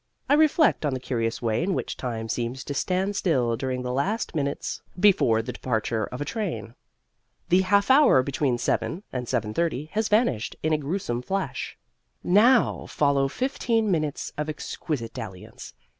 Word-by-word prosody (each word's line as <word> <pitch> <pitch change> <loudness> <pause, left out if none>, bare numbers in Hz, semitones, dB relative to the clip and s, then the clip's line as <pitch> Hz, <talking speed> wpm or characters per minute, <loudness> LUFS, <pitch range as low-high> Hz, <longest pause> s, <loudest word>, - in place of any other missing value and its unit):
I - - +3
reflect 310 - +4
on 145 -3 0
the - - -3
curious 115 -2 -2
way 110 +2 +1
in 185 +2 0
which - - -3
time 115 -3 -4
seems 120 +3 -3
to 145 - -4
stand 190 +7 0
still 125 -12 +1
during 130 0 -3
the 125 0 -3
last 200 - -1
minutes 140 -3 -2 0.2
before 150 - +4
the 125 +2 -5
departure 110 -3 -1
of 125 - -8
a 145 - -2
train. 205 - -4 0.8
The 180 +2 +5
half 200 +5 +3
hour 265 - +6
between 135 -2 0
7 165 +9 -1
and 125 -2 -3
7:30 130 +6 -1
has 215 0 0
vanished 210 - +1
in 155 0 +2
a - - +3
gruesome 140 -5 -2
flash. 185 -4 -3 0.5
Now 230 +6 +4
follow 140 -2 +2
fifteen 230 - 0
minutes 155 -4 -2
of 150 +1 -2
exquisite 145 -5 -4
dalliance. 95 -7 -9
145 Hz, 160 wpm, -25 LUFS, 125-195 Hz, 0.8 s, hour